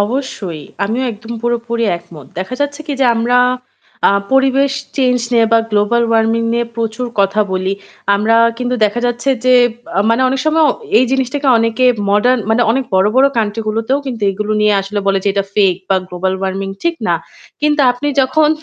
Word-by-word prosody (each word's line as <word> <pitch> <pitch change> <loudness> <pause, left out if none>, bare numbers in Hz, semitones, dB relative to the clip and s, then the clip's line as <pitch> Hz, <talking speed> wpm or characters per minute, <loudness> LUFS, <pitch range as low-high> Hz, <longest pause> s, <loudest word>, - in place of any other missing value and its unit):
অবশ্যই। 205 - -3 0.2
আমিও 225 +6 -2
একদম 225 +2 -9
পুরোপুরি 235 -1 -1
একমত। 155 -5 -14
দেখা 190 +6 -4
যাচ্ছে 285 +1 -2
কি? 295 - -3
যে - - +4
আমরা 240 +2 +2 0.7
আ - - +4 0.2
পরিবেশ 270 +1 +3 0.2
চেঞ্জ 250 -2 +2
নিয়ে 230 -1 +4
বা 230 - +6
global 210 +3 +2
warming 225 +1 +1
নিয়ে 235 0 0
প্রচুর 230 +2 -3
কথা 200 +2 +2
বলি। 185 +1 -1 0.4
আমরা 215 +3 +2 0.2
কিন্তু 250 0 -1
দেখা 210 +3 -1
যাচ্ছে 240 +2 -2 0.2
যে 255 0 +5 0.3
বা - - -1
মানে 230 +3 +2
অনেক 265 +1 -1
সময় 315 +1 +3 0.3
এই - - +4
জিনিসটাকে 270 +1 -1
অনেকে 230 +2 0 0.3
modern 245 +5 +3
মানে 235 +2 +3
অনেক 260 +3 0
বড়, 190 +1 +4
বড় 265 +1 +6
country 215 0 -1
গুলোতেও 225 +5 0
কিন্তু 240 -5 -5
এগুলো 210 +2 -3
নিয়ে 210 -1 +3
আসলে 195 +2 -4
বলে 195 0 +2
যে - - +2
এটা 200 0 -1
fake 190 -3 +2
বা 195 - +3
global 185 +1 -2
warming 195 0 -3
ঠিক 340 0 0
না। - - +3 0.5
কিন্তু 300 0 +2
আপনি 245 +4 -4
যখন 270 +4 +2
230 Hz, 180 wpm, -15 LUFS, 205-255 Hz, 0.7 s, বা